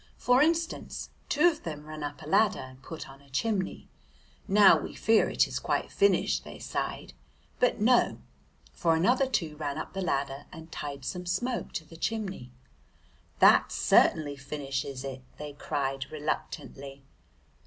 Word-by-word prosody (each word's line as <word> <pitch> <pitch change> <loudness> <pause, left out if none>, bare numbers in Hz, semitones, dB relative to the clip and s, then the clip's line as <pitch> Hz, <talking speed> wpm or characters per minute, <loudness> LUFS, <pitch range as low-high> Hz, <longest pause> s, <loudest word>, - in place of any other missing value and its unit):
For 250 +1 +4
instance, 330 +2 0 0.2
two 300 +4 +4
of 320 -3 +1
them 150 -2 -6
ran 155 0 -8
up 145 -1 -5
a - - -9
ladder 210 +5 +4
and 130 0 -10
put 160 +3 -8
on 135 +1 -14
a 140 - -21
chimney. 190 - -1 0.6
"Now 205 0 +7
we - - -7
fear 225 0 +3
it - - +3
is - - -3
quite - - -1
finished," 405 0 +2
they - - -10
sighed. - - -4 0.5
But 250 - +2
no, 240 +3 +4 0.6
for 165 -1 +2
another 245 +11 +3
two 160 -11 -1
ran 145 -2 -3
up - - -6
the 195 - -3
ladder, 140 -4 -2
and 160 -1 -11
tied 140 -3 -6
some 180 -1 -4
smoke 240 +8 -1
to 160 - -4
the 165 +1 -13
chimney. 190 - -3 0.9
"That - - +6
certainly 145 -2 +3
finishes 135 -1 -4
it," 135 -1 -6 0.2
they 150 -1 -7
cried 135 -2 -3
reluctantly. 140 -2 -5
155 Hz, 155 wpm, -29 LUFS, 140-210 Hz, 0.9 s, Now